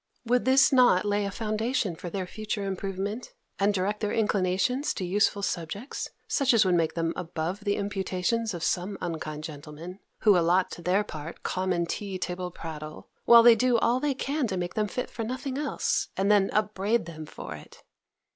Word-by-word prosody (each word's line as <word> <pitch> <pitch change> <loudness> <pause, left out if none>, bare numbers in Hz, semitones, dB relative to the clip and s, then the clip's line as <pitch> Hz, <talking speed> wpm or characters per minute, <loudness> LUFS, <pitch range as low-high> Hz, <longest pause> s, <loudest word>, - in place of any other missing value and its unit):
Would 245 +2 +1
not 260 -2 +6
this - - -9
lay 205 0 +1
a - - -1
foundation 215 - -1
for 175 - -7
their 185 +1 -3
future 210 +2 -4
improvement, 195 +4 -4 0.3
and 200 +1 +3
direct 200 +2 -1
their 210 - -1
inclinations 210 +5 +1
to 185 - -3
useful 200 +2 +1
subjects, 200 - -4 0.2
such 270 -4 +3
as 215 -3 +5
would 185 - +3
make 165 -2 +1
them 165 0 0
above 175 +3 -4
the 200 0 +2
imputations 200 +2 -1
of 170 - -5
some 190 +3 -1
unkind 155 -2 -4
gentlemen, 155 +4 -8 0.2
who 210 -3 +6
allot 175 +2 +3
to - - -8
their 185 +4 +2
part 155 -4 -8
common 185 -2 0
tea 195 +2 -4
table 180 0 -4
prattle, 155 -3 -8 0.2
while 235 -1 +9
they 235 0 +9
do 245 +1 +3
all 235 +2 +2
they 285 0 0
can 280 0 -1
to 190 -3 -3
make 175 0 -3
them 215 -1 0
fit 250 +5 -3
for 230 - -4
nothing 255 +3 -4
else, 295 - 0
and 195 +2 +2
then 200 -2 +4
upbraid 210 +1 0
them 155 -2 -8
for - - -8
it? - - -13
200 Hz, 185 wpm, -27 LUFS, 175-220 Hz, 0.3 s, while